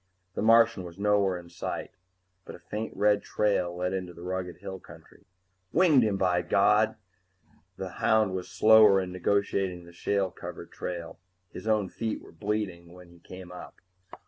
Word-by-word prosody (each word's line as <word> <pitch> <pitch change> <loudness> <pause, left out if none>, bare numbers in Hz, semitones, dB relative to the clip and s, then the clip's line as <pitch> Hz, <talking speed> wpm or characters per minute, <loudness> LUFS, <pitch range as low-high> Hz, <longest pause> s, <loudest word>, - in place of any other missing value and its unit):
The - - -3
Martian 115 -2 +5
was 85 0 -10
nowhere 100 -2 +2
in 85 -1 -11
sight, 85 - -5 0.5
but - - -10
a - - -13
faint 110 +1 -6
red 105 -1 +3
trail 100 -4 0
led 90 +1 -2
into 90 -2 -4
the 85 - -11
rugged 90 -1 -4
hill 95 0 -7
country. - - -17 0.5
Winged 160 -5 +5
him, 105 -4 +1
by 90 -2 +2
God! 105 +5 +3 0.8
The - - -5
hound 110 -3 +3
was 90 -1 -4
slower 110 -2 +6
in 90 -1 -4
negotiating 95 -1 -1
the 85 - -15
shale 95 +1 -1
covered - - -9
trail; 85 -2 -6 0.3
his - - -8
own 105 -3 +2
feet 110 +4 -4
were - - -15
bleeding 100 -5 -4
when 90 -1 -14
he 85 - -18
came 90 +1 -11
up. 90 - -10
95 Hz, 170 wpm, -28 LUFS, 90-105 Hz, 0.8 s, slower